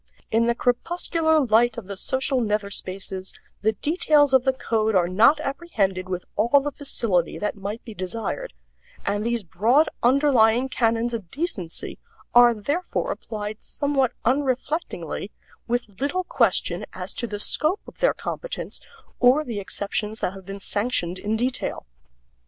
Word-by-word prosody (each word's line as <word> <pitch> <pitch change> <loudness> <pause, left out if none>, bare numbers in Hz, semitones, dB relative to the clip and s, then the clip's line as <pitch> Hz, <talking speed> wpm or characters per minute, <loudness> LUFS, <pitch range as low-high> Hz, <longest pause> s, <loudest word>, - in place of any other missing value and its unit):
In 230 +1 +3
the 235 - +2
crepuscular 320 +5 +1
light 240 -3 +3
of 230 - -6
the 200 +1 -6
social 260 +5 +1
nether 210 -2 -1
spaces 190 0 -4 0.3
the 220 +2 +2
details 295 - +3
of 260 -1 +5
the 265 - +5
code 220 -4 0
are 175 -2 +4
not 225 - +5
apprehended 200 - -1
with 180 -1 -3
all 235 +7 +4
the 290 +1 -3
facility 230 - 0
that 210 - -2
might 205 +3 -5
be 225 - -8
desired, 225 - -4 0.5
and 205 +1 0
these 235 -1 0
broad 235 - +3
underlying 250 -2 +4
canons 230 -1 +1
of 215 -7 -5
decency 210 - -4 0.3
are 240 -1 +7
therefore 290 - -2
applied 210 -1 -5
somewhat 280 -3 0
unreflectingly, 260 - -1 0.4
with 235 -4 -3
little 360 +7 0
question - - +1
as - - -5
to 235 - -3
the 210 - -4
scope 310 - +1
of - - -14
their - - +3
competence - - -5 0.4
or 260 +5 +5
the 230 -7 -4
exceptions 210 +2 -3
that 180 - -1
have 195 -1 -12
been 195 0 -6
sanctioned 195 -4 -1
in 210 +1 -1
detail. 245 +3 -2
230 Hz, 150 wpm, -24 LUFS, 205-275 Hz, 0.5 s, are